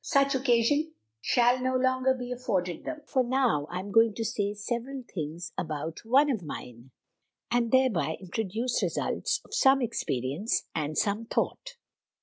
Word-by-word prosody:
Such 275 Hz, -2 st, +3 dB
occasion 270 Hz, +4 st, +2 dB, 0.3 s
shall 245 Hz, -, +3 dB
no 255 Hz, 0 st, 0 dB
longer 260 Hz, 0 st, +2 dB
be 250 Hz, -1 st, -6 dB
afforded 190 Hz, -9 st, -2 dB
them; 310 Hz, -1 st, -5 dB
for 265 Hz, -3 st, +1 dB
now 245 Hz, -, +1 dB
I 180 Hz, -, -3 dB
am 200 Hz, +1 st, -8 dB
going 225 Hz, 0 st, +4 dB
to 225 Hz, -, -2 dB
say 205 Hz, -1 st, -1 dB
several 245 Hz, +5 st, -4 dB
things 160 Hz, 0 st, -5 dB
about 160 Hz, 0 st, -4 dB
one 275 Hz, +6 st, +4 dB
of 225 Hz, -7 st, -2 dB
mine, 125 Hz, -5 st, -8 dB, 0.6 s
and 235 Hz, -1 st, +1 dB
thereby 205 Hz, -, +2 dB
introduce 220 Hz, +5 st, -2 dB
a -, -, +3 dB
few -, -, +1 dB, 0.2 s
results -, -, -1 dB
of -, -, -19 dB, 0.3 s
much 265 Hz, -, -2 dB
experience 150 Hz, -, -1 dB
and 155 Hz, -1 st, -2 dB
some 210 Hz, +2 st, 0 dB
thought. -, -, -2 dB
230 Hz, 160 wpm, -28 LUFS, 180-260 Hz, 0.6 s, going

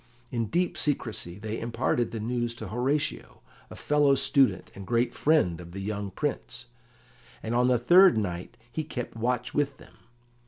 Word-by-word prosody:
In 115 Hz, -3 st, -1 dB
deep 175 Hz, -, 0 dB
secrecy 110 Hz, -, -2 dB
they 110 Hz, +2 st, -4 dB
imparted 120 Hz, 0 st, 0 dB
the 115 Hz, -, -5 dB
news 120 Hz, +1 st, -2 dB
to 105 Hz, -, -7 dB
Horatio, 130 Hz, +7 st, -2 dB, 0.3 s
a -, -, -9 dB
fellow 145 Hz, -2 st, +3 dB
student 135 Hz, 0 st, +2 dB
and 100 Hz, -1 st, -10 dB
great 120 Hz, 0 st, +1 dB
friend 115 Hz, -, +2 dB
of 85 Hz, 0 st, -11 dB
the 100 Hz, -, -6 dB
young 100 Hz, 0 st, -3 dB
Prince, 120 Hz, +1 st, -4 dB, 0.8 s
and 110 Hz, -, -3 dB
on 125 Hz, +1 st, +3 dB
the 125 Hz, -1 st, +4 dB
third 175 Hz, +7 st, +6 dB
night 90 Hz, -4 st, -3 dB
he 155 Hz, -, -2 dB
kept 125 Hz, -7 st, -6 dB
watch 125 Hz, +2 st, -1 dB
with 140 Hz, -2 st, 0 dB
them. -, -, -16 dB
120 Hz, 165 wpm, -27 LUFS, 110-140 Hz, 0.8 s, third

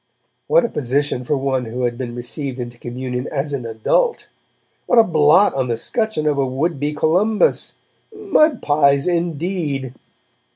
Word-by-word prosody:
What -, -, +4 dB
a -, -, -2 dB
position 140 Hz, -1 st, -1 dB
for 145 Hz, +3 st, 0 dB
one 130 Hz, -2 st, -1 dB
who 120 Hz, +3 st, -4 dB
had 120 Hz, -1 st, 0 dB
been 120 Hz, -1 st, -6 dB
received 125 Hz, +2 st, -5 dB
into 120 Hz, -1 st, -7 dB
communion 125 Hz, +1 st, -5 dB
'as 145 Hz, 0 st, -3 dB
an 125 Hz, -4 st, -3 dB
adult'! 115 Hz, -, 0 dB, 0.6 s
What 245 Hz, -, +2 dB
a 230 Hz, -, +8 dB
blot 160 Hz, +1 st, +4 dB
on 130 Hz, -2 st, -1 dB
the 115 Hz, -2 st, -1 dB
scutcheon 220 Hz, -, -2 dB
of 145 Hz, -2 st, +1 dB
a -, -, +3 dB
would 140 Hz, +4 st, -2 dB
be 145 Hz, +1 st, -1 dB
Columbus! 180 Hz, +8 st, +1 dB, 0.4 s
'Mud 380 Hz, -, +1 dB
pies', 140 Hz, -2 st, +3 dB
indeed! 165 Hz, -6 st, -2 dB
145 Hz, 160 wpm, -19 LUFS, 125-175 Hz, 0.6 s, a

